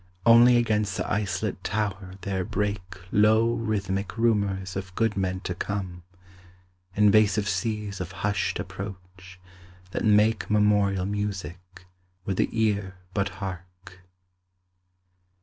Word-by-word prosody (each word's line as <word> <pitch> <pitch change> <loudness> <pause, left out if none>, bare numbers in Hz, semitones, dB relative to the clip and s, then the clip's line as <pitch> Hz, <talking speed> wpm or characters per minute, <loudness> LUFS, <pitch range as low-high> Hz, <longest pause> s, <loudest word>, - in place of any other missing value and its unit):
Only 120 +1 +7
against 105 -5 0
the - - -2
isolate 100 -3 -2
Tower 100 -3 -3
there 95 -1 -2
break 105 +1 -2 0.3
Low 110 +3 +4
rhythmic 100 -3 -2
rumours 100 -5 0
of 95 -1 -6
good 115 0 +1
men 95 -1 -1
to 90 - -3
come: 90 -1 -4 0.9
Invasive 105 0 +4
seas 105 +1 -2
of 90 0 -5
hushed 105 -1 0
approach, 90 -1 -8 0.5
that - - -3
make 105 +1 +3
Memorial 105 -3 +2
music, 95 -3 -5 0.4
would 95 -2 -2
the - - +2
ear 105 -4 0 0.2
but 100 -1 0
hark. 95 -1 -9
100 Hz, 115 wpm, -26 LUFS, 95-105 Hz, 0.9 s, Only